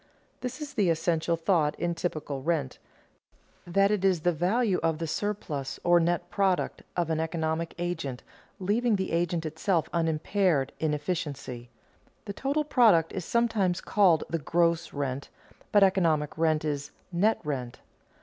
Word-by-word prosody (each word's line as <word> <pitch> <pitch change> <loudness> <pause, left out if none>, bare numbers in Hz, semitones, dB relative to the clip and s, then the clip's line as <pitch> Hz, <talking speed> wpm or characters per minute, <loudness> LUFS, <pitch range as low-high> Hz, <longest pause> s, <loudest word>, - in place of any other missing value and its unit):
This 255 +2 -5
is 295 -1 -6
the 200 -5 +2
essential 165 0 +1
thought 165 -3 +1
in 175 0 0
typical 155 -5 -4
rent 150 -3 -1 0.9
that 195 +3 +3
it 210 -3 0
is 185 -4 +3
the 175 - +3
value 185 +5 +1
of 165 -1 +1
the 165 - -3
surplus, 155 -6 -3
or 175 0 +5
net 175 +1 0
product, 195 -3 0 0.2
of 170 -2 0
an 160 - 0
economic 160 0 -2
agent 165 -7 -3 0.4
leaving 215 +4 +1
the 190 -1 -2
agent 170 0 0
itself 160 +2 0
unimpaired 165 -2 +1
in 155 -2 +1
efficiency. 145 -6 -4 0.6
The 200 - -5
total 280 +8 0
product 220 - +4
is 185 -3 -4
sometimes 215 -7 +1
called 185 -7 +3
the 165 - -2
"gross 170 +2 +1
rent," 140 -1 -3 0.4
but 205 -1 +6
economic 165 -6 +2
rent 155 -1 +1
is 145 -2 -2 0.2
"net 205 +6 +2
rent." 130 -5 -4
170 Hz, 150 wpm, -28 LUFS, 155-195 Hz, 0.9 s, but